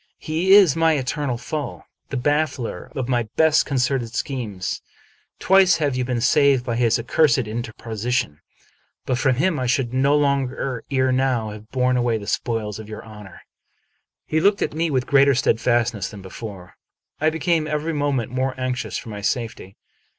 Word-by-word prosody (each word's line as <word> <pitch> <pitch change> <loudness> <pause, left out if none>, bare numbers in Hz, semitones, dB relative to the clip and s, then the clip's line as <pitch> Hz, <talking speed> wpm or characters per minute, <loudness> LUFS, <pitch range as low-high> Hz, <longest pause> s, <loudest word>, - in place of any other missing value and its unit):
" - - -46
He 170 +5 +1
is 190 -9 +6
my 165 -1 +3
eternal 135 -2 -2
foe; 145 +5 -5 0.3
the 140 - -3
baffler 145 - -1
of 130 -3 -2
my 120 -4 0
best 160 -1 +4
concerted 125 -3 -1
schemes. 110 -10 -3 0.6
Twice 190 -2 +4
have 145 -5 0
you 130 - 0
been 125 -2 -2
saved 135 0 +3
by 120 - -2
his 115 -1 +2
accursed 125 +4 +2
in 110 +3 -3
terposition. 115 -7 -3 0.7
But 125 -1 -1
for 135 -1 +3
him 150 +5 +1
I 130 - -1
should 125 -1 0
long 140 0 +2 0.4
ere 130 -1 +1
now 130 -4 0
have 105 +1 -11
borne 125 0 +1
away 120 -2 +1
the 105 - -8
spoils 110 -2 -2
of 110 -1 -10
your 110 - -8
honor." 105 -3 -12 0.8
He 155 - 0
looked 200 +4 +3
at - - -3
me 165 +2 0
with 130 -3 0
greater 140 -1 +4
steadfastness 120 -4 +1
than 100 -3 -11
before. 95 -2 -9 0.4
I 155 - +3
became 160 0 0
every 155 +1 -2
moment 140 -5 -1
more 130 0 -2
anxious 130 0 -2
for 115 - -8
my 105 -1 -6
safety. 110 -4 -3
130 Hz, 170 wpm, -22 LUFS, 115-145 Hz, 0.8 s, is